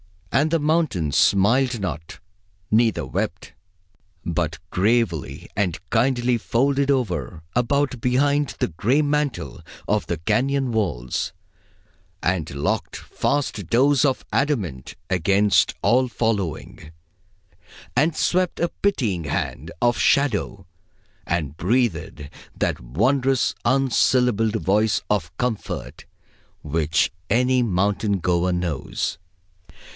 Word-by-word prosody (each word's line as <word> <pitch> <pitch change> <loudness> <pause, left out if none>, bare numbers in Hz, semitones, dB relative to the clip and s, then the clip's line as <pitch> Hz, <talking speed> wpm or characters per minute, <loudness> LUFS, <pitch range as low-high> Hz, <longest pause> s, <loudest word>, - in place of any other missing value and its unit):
And 150 +3 +2
the 165 +1 +1
mountains 150 - 0
smiled 120 +6 +3
not, 80 -4 -5 0.5
neither 115 0 +2
wept, - - -4 0.7
but 80 -2 -1
gravely 100 - 0
and 95 -4 0
kindly 125 -2 +2
folded 140 +5 +1
over, 85 - -1
about, 130 +1 +1
behind, 140 +3 +1
the - - 0
gray 115 - +1
mantle 145 - -2 0.3
of 105 +1 0
the 85 - -2
cañon 130 - 0
walls, 85 - -2 0.9
and 90 -3 0
locked 70 +1 -2
fast 130 - -2
doors 135 +5 +3
of 135 -3 0
adamant 100 - -1
against 100 +3 +3
all 130 +2 +3
following, 100 - -3 1.0
and 155 +2 +2
swept 180 0 0
a 170 - +1
pitying 110 - -1
hand 70 - -3
of 120 -1 +3
shadow, 100 -8 +1 0.6
and 80 -4 -2
breathed 90 - -1 0.3
that - - -1
wondrous 125 - +1
unsyllabled 125 -4 +2
voice 105 +1 +1
of 95 -4 -1
comfort 110 - -4 0.6
which 80 +1 +1 0.2
any 125 +3 +3
mountain 100 -1 +1
goer 90 0 +1
knows. 85 -2 -3
110 Hz, 100 wpm, -23 LUFS, 85-130 Hz, 1.0 s, smiled